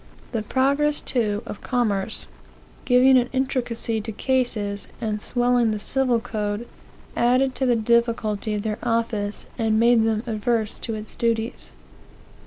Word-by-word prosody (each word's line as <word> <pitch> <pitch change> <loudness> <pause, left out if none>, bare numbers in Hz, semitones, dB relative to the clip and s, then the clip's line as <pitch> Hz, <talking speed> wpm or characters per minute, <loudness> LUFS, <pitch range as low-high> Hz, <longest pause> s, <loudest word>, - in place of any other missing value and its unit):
The 230 - -1
progress, 280 +6 +1
too, 210 -4 -1
of - - -7
commerce, 220 -5 -1 0.6
giving 255 +1 +6
an 245 0 -1
intricacy 240 -4 -1
to 220 +1 -5
cases, 215 -4 -1
and 215 -3 -2
swelling 245 -1 +2
the 215 - -1
civil 250 +1 +1
code, 215 -1 -3 0.5
added 255 +2 +3
to 265 - +1
the 245 - +4
difficulty 225 -2 +1
of 205 - -3
their 215 -1 -2
office, 230 -3 -1
and 220 -1 +2
made 235 -1 +5
them 220 -1 0
averse 220 -1 -1
to 225 - -4
its 215 0 -9
duties. 230 0 -1
230 Hz, 140 wpm, -23 LUFS, 215-245 Hz, 0.6 s, giving